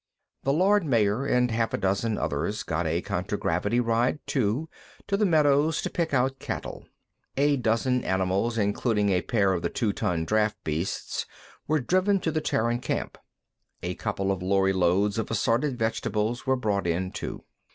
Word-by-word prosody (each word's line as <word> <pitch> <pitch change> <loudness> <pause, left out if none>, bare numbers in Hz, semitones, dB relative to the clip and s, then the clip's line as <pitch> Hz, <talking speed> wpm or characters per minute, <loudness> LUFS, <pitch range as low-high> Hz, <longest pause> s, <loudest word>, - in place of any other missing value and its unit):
The 135 - +1
Lord 190 +6 +3
Mayor 115 -2 +1
and 125 -2 +2
half 115 0 0
a - - -2
dozen 100 +3 0
others - - -2
got 80 +1 -1
a 85 +3 -1
contragravity 100 +8 -1
ride, 120 +3 +1
too, 130 +4 0 0.4
to 200 - 0
the 205 0 +2
meadows 150 -1 +3
to - - -3
pick 170 -2 -1
out 135 0 +1
cattle. - - -6 0.5
A 145 +1 +3
dozen 125 +1 +1
animals, 95 +5 0
including 105 0 +1
a 90 -2 +2
pair 100 -5 +1
of 85 - -1
the 85 - -1
two 105 -4 -1
ton 80 -2 -1
draft 110 +2 +1
beasts, 80 +4 -3 0.4
were 155 +1 +2
driven 185 +8 +2
to 160 - 0
the 155 0 -1
Terran 120 -3 0
camp. - - -3 0.7
A - - -2
couple 95 0 -2
of 95 -2 -2
lorry 95 +1 +2
loads 95 +4 +2
of 110 - -3
assorted 120 +5 +1
vegetables 115 +1 -1
were 130 - +4
brought 105 -7 -1
in, 90 +2 -1
too. - - -6
115 Hz, 170 wpm, -26 LUFS, 95-135 Hz, 0.7 s, were